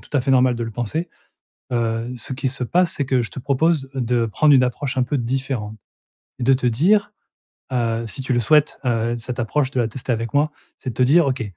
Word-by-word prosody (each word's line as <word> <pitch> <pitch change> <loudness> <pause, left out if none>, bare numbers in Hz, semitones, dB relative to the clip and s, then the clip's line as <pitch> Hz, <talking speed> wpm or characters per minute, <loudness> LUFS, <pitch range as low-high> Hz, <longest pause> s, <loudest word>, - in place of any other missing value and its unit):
tout - - -16
à - - +3
fait 135 - 0
normal 130 -1 +4
de 115 - -3
le 115 - -5
penser. 120 - -3 0.7
Heu, 115 +1 -1
ce 125 - -6
qu'il 130 +1 -1
se 130 -1 -3
passe, 175 +7 +2
c'est 140 - -1
que 130 -1 +2
je 115 - -5
te - - -7
propose 140 +2 +1
de 125 -2 0
prendre 145 +7 +3
une 130 - +6
approche 130 +2 -2
un 125 - +3
peu 140 +3 -1
différente 125 -3 -3 0.6
et 125 - -3
de 135 +2 +5
te 125 -1 +1
dire 205 - +2 0.6
heu, 115 -2 0
si 130 +4 -4
tu 130 - -2
le 120 - +2
souhaites, 150 +4 +3
heu, 120 -1 0
cette 120 +1 -5
approche 130 +4 0
de 125 - 0
la 115 - 0
tester 125 +2 -4
avec 115 +1 -3
moi, 150 +1 +2 0.2
c'est 130 - -5
de - - -9
te 130 - +1
dire: 150 +5 +5
«OK, 130 -2 -1
125 Hz, 240 wpm, -21 LUFS, 115-140 Hz, 0.7 s, une